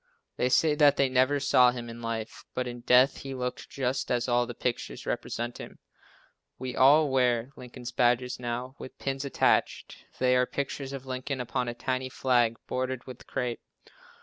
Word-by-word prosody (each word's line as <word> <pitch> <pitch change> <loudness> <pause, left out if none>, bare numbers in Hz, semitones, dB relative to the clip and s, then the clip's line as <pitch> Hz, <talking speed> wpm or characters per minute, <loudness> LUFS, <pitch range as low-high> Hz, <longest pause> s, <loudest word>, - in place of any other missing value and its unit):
They 125 - +1
say 155 +4 +4
that 145 -1 +5
they 135 -1 +3
never 130 +3 +3
saw 125 -2 +5
him 120 -1 -5
in 115 0 -9
life, 115 -1 -5
but 125 0 -1
in 120 0 -6
death 125 +3 +4
he 135 -1 -6
looked 125 -1 -4
just 130 0 -2
as 120 0 0
all 120 0 +2
the 120 - -7
pictures 125 -1 -3
represent 120 +1 -3
him. - - -9 0.8
We 130 0 -5
all 145 +2 +5
wear 125 -1 +2
Lincoln 125 0 -11
badges 125 +1 +2
now, 125 +2 -4
with - - -10
pin 135 0 -3
attached. 140 - +1 0.2
They 125 0 +3
are 125 0 +3
pictures 140 -1 -4
of 135 -1 -7
Lincoln 130 +1 -4
upon 125 0 -2
a 120 - -4
tiny 130 +1 -2
flag, 120 -3 +2
bordered 130 -1 -3
with 130 -2 -11
crape. 125 -2 -3
125 Hz, 175 wpm, -28 LUFS, 120-130 Hz, 0.8 s, that